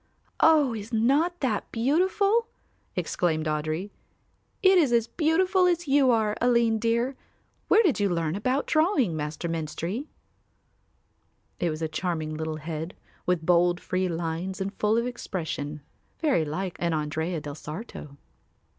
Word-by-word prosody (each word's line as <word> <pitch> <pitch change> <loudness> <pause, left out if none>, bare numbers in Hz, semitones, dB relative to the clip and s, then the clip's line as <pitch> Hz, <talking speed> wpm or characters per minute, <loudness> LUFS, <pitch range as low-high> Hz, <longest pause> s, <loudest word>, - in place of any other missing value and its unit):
"Oh, 300 -6 +5
is 215 +1 -7
not 285 +10 +2
that 230 -7 -1
beautiful?" 380 - +2 0.5
exclaimed 160 -3 0
Audry. 155 +5 -2 0.7
"It 380 -1 +7
is 290 -7 +3
as 235 -2 +3
beautiful 365 - +2
as 350 -2 0
you 275 -1 +4
are, 220 -3 +2
Aline 235 -2 +3
dear. 235 +4 0 0.5
Where 450 - +5
did 330 - +2
you 200 -1 +2
learn 165 -2 -1
about 255 +7 0
drawing, 310 - +2
Master 150 +2 -4
Menstrie?" 165 - -3 1.5
It 175 - +1
was 155 +1 -4
a - - +1
charming 155 -1 -3
little 160 0 -3
head 160 +2 -5 0.3
with 180 -3 +1
bold 175 0 +3
free 185 0 -1
lines 170 +2 -3
and 195 +1 -3
full 215 +2 +1
of 235 - +1
expression, 160 -10 -4 0.4
very 285 - +2
like 180 +4 -4
an 170 -2 0
Andrea 160 +3 -2
del 145 -1 -7
Sarto. 150 -2 -8
195 Hz, 140 wpm, -26 LUFS, 160-265 Hz, 1.5 s, It